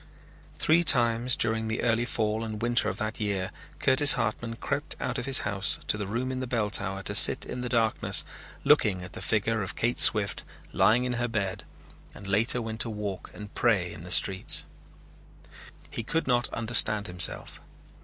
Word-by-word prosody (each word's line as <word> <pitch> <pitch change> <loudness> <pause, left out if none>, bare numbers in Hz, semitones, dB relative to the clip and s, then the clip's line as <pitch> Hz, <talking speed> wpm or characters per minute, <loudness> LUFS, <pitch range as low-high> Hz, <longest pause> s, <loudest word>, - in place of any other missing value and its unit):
Three 170 +2 +2
times 120 -3 +2
during 110 0 -1
the 110 - -3
early 120 0 +1
fall 110 -2 -2
and 110 -1 -6
winter 120 +1 +1
of - - -6
that 110 0 -4
year 100 -3 -2 0.3
Curtis 145 +2 +5
Hartman 115 +1 -3
crept 140 +4 -3
out - - -3
of 125 - -6
his 135 -1 +3
house 100 -1 +1
to - - 0
the 105 -2 -5
room 120 +5 -3
in 130 - -4
the 130 - -4
bell 115 -4 -2
tower 95 -1 -3
to - - -4
sit - - +6
in 125 - -6
the 125 - -4
darkness 115 -2 +1 0.4
looking 95 -4 +2
at 90 - -11
the - - -9
figure 110 +1 -1
of 95 - -5
Kate 120 +1 -1
Swift 105 -2 +4 0.3
lying 125 +3 +3
in 125 -1 -2
her 120 - 0
bed 100 -5 -3 0.5
and 100 - -12
later 115 +5 +1
went 110 0 -6
to 115 - 0
walk 105 -3 -6
and 105 -1 -10
pray 100 -8 +1
in 85 - -11
the 90 - -9
streets. 95 +1 +1 1.3
He - - -4
could 165 +8 -2
not 120 -1 +1
understand 110 -2 +1
himself. 90 -2 -1
110 Hz, 185 wpm, -27 LUFS, 105-120 Hz, 1.3 s, sit